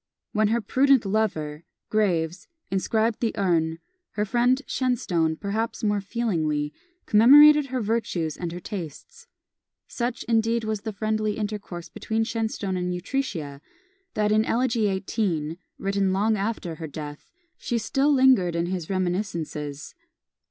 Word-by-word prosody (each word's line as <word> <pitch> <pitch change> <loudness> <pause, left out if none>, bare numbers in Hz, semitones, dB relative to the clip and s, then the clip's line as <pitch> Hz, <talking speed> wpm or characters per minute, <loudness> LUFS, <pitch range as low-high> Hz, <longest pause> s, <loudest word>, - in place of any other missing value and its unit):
When 215 0 +2
her 230 +2 +1
prudent 265 +3 +3
lover, 170 -7 -1 0.3
Graves, 180 -3 0 0.2
inscribed 220 +3 +1
the 230 -2 -1
urn, 165 -4 +1 0.4
her 210 - 0
friend 245 +4 +2
Shenstone, 175 -11 0
perhaps 215 +7 -3
more 205 -1 +1
feelingly, 160 -10 -1 0.3
commemorated 290 +6 +7
her 255 -1 -2
virtues 200 -8 -1
and 175 -2 -4
her 175 - -6
tastes. 210 - -8 0.6
Such, 240 +1 -3
indeed, 230 0 +1
was 215 -2 -2
the 220 - -4
friendly 215 +1 -1
intercourse 205 -5 -5
between 220 0 -2
Shenstone 220 -4 -2
and 180 0 -2
Utrecia, 180 - -3 0.5
that 210 0 +1
in 215 +1 +4
Elegy 230 -2 +1
XVIII., 190 -5 -2 0.2
written 195 -1 0
long 215 +3 +2
after 200 -5 -3
her 160 - -4
death, 150 0 -8 0.3
she 240 - -2
still 270 +6 +1
lingered 255 -11 +4
in 170 0 0
his 175 -2 -4
reminiscences. 170 -6 -3
210 Hz, 130 wpm, -25 LUFS, 175-230 Hz, 0.6 s, commemorated